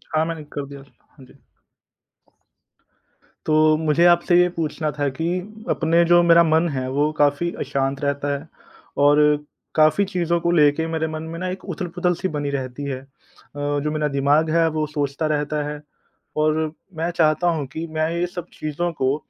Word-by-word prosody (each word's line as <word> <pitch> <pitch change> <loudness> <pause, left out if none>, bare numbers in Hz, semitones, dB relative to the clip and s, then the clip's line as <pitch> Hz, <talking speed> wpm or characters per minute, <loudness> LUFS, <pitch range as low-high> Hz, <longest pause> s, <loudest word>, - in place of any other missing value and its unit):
हाँ 155 +1 +3
मैंने 165 -2 -5
कर 145 - -4
दिया 140 0 -10
था। 140 - -28
हाँ 135 - -14
जी। 140 - -21 2.1
तो 155 0 +4
मुझे 160 +2 +2
आपसे 175 0 +4
ये 180 - +4
पूछना 155 -1 -2
था 145 -1 -2
कि 160 +5 -4 0.4
अपने 165 +1 +3
जो 175 +1 +5
मेरा 170 0 +6
मन 160 +1 +2
है 130 -3 -3
वो 145 +3 +1
काफ़ी 145 +4 +2
अशांत 135 0 -2
रहता 140 0 -1
है 145 +3 -12 0.6
और 145 +1 +5 0.6
काफ़ी 155 +6 +4
चीज़ों 170 -3 0
को 170 0 +1
लेकर 155 -1 +3
मेरे 160 -1 -1
मन 155 0 -5
में 165 - -6
ना 185 - -3
एक 185 +1 -6
उथल-पुथल 180 +1 -1
सी - - +1
बनी 145 -4 -3
रहती 135 0 -4
है। 135 -2 -3
अ, 135 - -20 0.5
जो 145 +1 -1
मेरा 155 -1 0
दिमाग 145 +3 +3
है 165 0 +3
वो 155 0 -1
सोचता 145 0 -2
रहता 150 0 -1
है 150 0 -7 0.6
और 155 0 +2 0.4
मैं 165 +2 -1
चाहता 165 0 +2
हूँ 155 -4 -2
कि 160 +1 -4
मैं 155 0 +1
ये 170 +1 0
सब 175 -1 -7
चीज़ों 155 +3 -2
को 130 +1 +2
155 Hz, 180 wpm, -22 LUFS, 145-170 Hz, 2.1 s, मेरा